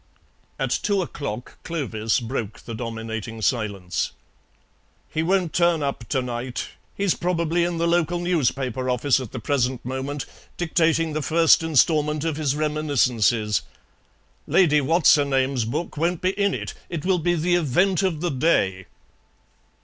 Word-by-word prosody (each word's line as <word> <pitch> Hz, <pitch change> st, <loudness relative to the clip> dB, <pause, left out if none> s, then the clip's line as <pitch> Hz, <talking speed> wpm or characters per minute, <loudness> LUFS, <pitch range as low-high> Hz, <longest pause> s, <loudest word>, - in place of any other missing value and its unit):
At -, -, -2 dB
two 200 Hz, -2 st, +1 dB
o'clock 125 Hz, -8 st, -6 dB
Clovis 120 Hz, -10 st, -1 dB
broke 115 Hz, -3 st, -4 dB
the 115 Hz, -, -8 dB
dominating 115 Hz, -1 st, -5 dB
silence. 100 Hz, -8 st, -1 dB, 1.0 s
"He 155 Hz, -, 0 dB
won't 180 Hz, -1 st, +1 dB
turn 170 Hz, -3 st, +2 dB
up 135 Hz, -5 st, -4 dB
to 130 Hz, -3 st, 0 dB
night. 120 Hz, 0 st, -4 dB, 0.3 s
He's 200 Hz, -3 st, +2 dB
probably 170 Hz, -1 st, 0 dB
in 175 Hz, 0 st, -1 dB
the 170 Hz, +1 st, +1 dB
local 175 Hz, 0 st, +1 dB
newspaper 135 Hz, -7 st, 0 dB
office 125 Hz, +2 st, +2 dB
at 125 Hz, -5 st, -7 dB
the -, -, -6 dB
present 125 Hz, 0 st, -1 dB
moment, 135 Hz, +3 st, -4 dB, 0.3 s
dictating 165 Hz, -1 st, +1 dB
the 155 Hz, -, -1 dB
first 165 Hz, +2 st, +4 dB
instalment 150 Hz, -1 st, +2 dB
of 160 Hz, -2 st, -1 dB
his 145 Hz, -3 st, 0 dB
reminiscences. 125 Hz, -8 st, +1 dB, 0.9 s
Lady 150 Hz, -6 st, +4 dB
What's 165 Hz, +5 st, +5 dB
her 145 Hz, -, +4 dB
name's 135 Hz, -3 st, +1 dB
book 150 Hz, +8 st, -4 dB
won't 170 Hz, +2 st, 0 dB
be 185 Hz, -, +2 dB
in 200 Hz, 0 st, 0 dB
it. -, -, -5 dB, 0.2 s
It 170 Hz, -2 st, -4 dB
will 185 Hz, -1 st, +2 dB
be 175 Hz, +2 st, +1 dB
the 175 Hz, +2 st, +1 dB
event 175 Hz, +4 st, +2 dB
of 180 Hz, -6 st, -1 dB
the 175 Hz, -, 0 dB
day." 95 Hz, -, +1 dB
150 Hz, 150 wpm, -23 LUFS, 125-170 Hz, 1.0 s, What's